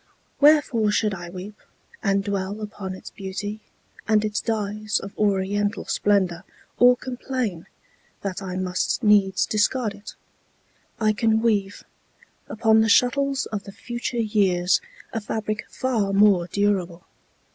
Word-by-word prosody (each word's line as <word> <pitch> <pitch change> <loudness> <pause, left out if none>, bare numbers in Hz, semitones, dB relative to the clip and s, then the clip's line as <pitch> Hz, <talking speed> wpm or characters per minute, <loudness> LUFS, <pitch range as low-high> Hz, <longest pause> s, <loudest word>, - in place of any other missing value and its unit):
Wherefore 285 -7 +4
should 210 0 +1
I 175 -2 -7
weep 190 +4 -9 0.4
And 195 0 +1
dwell 200 0 -3
upon 205 -3 -6
its - - -11
beauty, 205 +2 -5 0.5
and 215 -1 +3
its 210 -1 -1
dyes 215 -1 -1
Of 195 - -9
oriental 205 0 0
splendor, 190 -4 +1 0.4
or 245 0 +6
complain 245 -8 -4 0.5
That 195 -1 -4
I 185 -2 -5
must 185 +5 -1
needs 200 -3 +4
discard 215 +1 0
it? 205 +1 -11 0.8
I 215 -1 +2
can 220 0 +2
weave 205 -3 0 0.7
Upon 220 0 +3
the 220 - +2
shuttles 275 +4 +3
of 205 -2 -4
the 200 - -8
future 240 +3 -5
years 195 -5 +2 0.3
A 225 - -2
fabric 215 +1 -4
far 225 -7 -1
more 195 -3 +4
durable. 190 -4 -1
210 Hz, 130 wpm, -24 LUFS, 195-220 Hz, 0.8 s, or